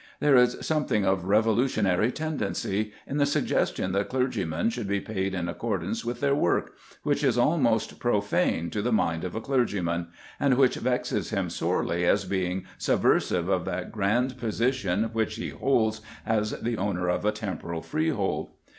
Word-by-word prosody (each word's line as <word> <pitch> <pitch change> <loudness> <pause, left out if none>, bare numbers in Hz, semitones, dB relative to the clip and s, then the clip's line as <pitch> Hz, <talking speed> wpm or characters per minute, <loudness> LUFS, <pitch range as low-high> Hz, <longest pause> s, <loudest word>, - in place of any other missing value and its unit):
There 145 -2 +4
is 125 -1 +5
a - - -10
something 150 -10 +1
of 95 -1 +1
revolutionary 110 -1 +2
tendency 110 -8 -2
in 140 - -3
the 145 - +4
suggestion 95 -8 0
that 100 +1 0
clergymen 115 -8 0
should 115 -3 -4
be 100 0 0
paid 95 -2 -3
in 85 -2 -2
accordance 100 +2 -2
with 120 +1 -4
their 140 -1 +3
work, 115 -11 +1 0.3
which - - 0
is - - +2
almost - - +2
profane 85 0 +1
to 105 - -1
the 120 +4 0
mind 85 -7 +1
of 90 - -4
a 110 - -2
clergyman, 100 -10 0 0.3
and 140 -3 +3
which 130 -1 +4
vexes 125 -1 -1
him - - -1
sorely 85 +1 0
as 100 +3 +3
being 95 -1 -2
subversive 85 -1 +2
of 95 -3 +1
that 90 +1 -4
grand 120 +5 0
position 115 -3 0
which 110 -1 0
he 115 - -4
holds 110 -5 +1 0.2
as 105 -1 0
the 120 -1 -2
owner 95 -3 -1
of 90 - 0
a 105 - +3
temporal 95 -6 -5
freehold. 155 -10 -1
105 Hz, 165 wpm, -27 LUFS, 95-125 Hz, 0.3 s, is